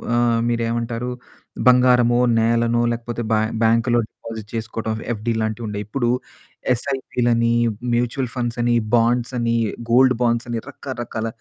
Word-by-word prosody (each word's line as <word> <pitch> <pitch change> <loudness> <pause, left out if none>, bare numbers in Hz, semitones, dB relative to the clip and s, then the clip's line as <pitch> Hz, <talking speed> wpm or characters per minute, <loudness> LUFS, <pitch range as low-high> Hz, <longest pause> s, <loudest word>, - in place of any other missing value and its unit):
ఆహ్, 120 -1 +2
మీరేమంటారు? 115 +1 -2 0.6
బంగారమో, 125 -1 +5 0.2
నేలనో 115 +1 +2
లేకపోతే 120 0 -4
బ్యా 110 - +3 0.2
బ్యాంకులో 115 +2 +3
డిపాజిట్ 110 -2 -9
చేసుకోవడం. 110 0 -3 0.2
ఎఫ్డీ 115 +1 -2
లాంటివి 110 +1 -2
ఉండేవి. 105 -1 -4
ఇప్పుడు 120 +1 -1 0.6
ఎస్ఐపిలని, 120 -2 0 0.4
మ్యూచువల్ 120 +2 0
ఫండ్స్ 120 -1 -2
అని 120 0 +2 0.2
బాండ్స్ 120 +2 +2
అని 115 -1 +1 0.4
గోల్డ్ 130 +1 +5
బాండ్స్ 120 0 +1
అని 115 -1 -2
రకరకాల 120 -5 -5
120 Hz, 120 wpm, -21 LUFS, 115-120 Hz, 0.6 s, బంగారమో